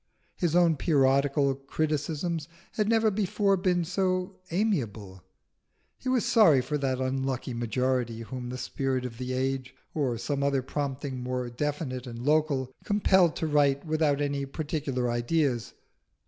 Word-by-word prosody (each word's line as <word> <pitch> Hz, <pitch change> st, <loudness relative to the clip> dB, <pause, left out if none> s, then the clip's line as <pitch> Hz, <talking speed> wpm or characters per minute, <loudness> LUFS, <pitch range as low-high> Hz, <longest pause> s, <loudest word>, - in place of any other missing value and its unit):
His 170 Hz, -2 st, 0 dB
own 170 Hz, -3 st, +4 dB
periodical 140 Hz, -1 st, +3 dB
criticisms 155 Hz, +3 st, -2 dB, 0.2 s
had 215 Hz, -1 st, 0 dB
never 225 Hz, -1 st, +3 dB
before 200 Hz, 0 st, +1 dB
been 180 Hz, -2 st, +1 dB
so 185 Hz, +1 st, -1 dB
amiable: 115 Hz, -, -1 dB, 0.8 s
he 255 Hz, -, -3 dB
was 255 Hz, -3 st, +2 dB
sorry 175 Hz, -, +6 dB
for 140 Hz, +4 st, -2 dB
that 130 Hz, -2 st, -1 dB
unlucky 130 Hz, -1 st, -2 dB
majority 120 Hz, 0 st, -1 dB
whom 125 Hz, +1 st, -6 dB
the 125 Hz, -, -5 dB
spirit 130 Hz, 0 st, -2 dB
of 115 Hz, -2 st, -7 dB
the 130 Hz, 0 st, -3 dB
age, 130 Hz, 0 st, -2 dB, 0.2 s
or 135 Hz, -6 st, 0 dB
some 140 Hz, +4 st, -2 dB
other 140 Hz, -2 st, +1 dB
prompting 140 Hz, -1 st, -3 dB
more 125 Hz, -1 st, -3 dB
definite 135 Hz, -1 st, -3 dB
and 120 Hz, 0 st, -7 dB
local, 145 Hz, -4 st, +2 dB
compelled 190 Hz, -5 st, +3 dB
to -, -, -2 dB
write 145 Hz, -2 st, +2 dB
without 155 Hz, -2 st, +1 dB
any 140 Hz, -1 st, -1 dB
particular 140 Hz, -4 st, -2 dB
ideas. 120 Hz, 0 st, 0 dB
140 Hz, 140 wpm, -28 LUFS, 130-160 Hz, 0.8 s, sorry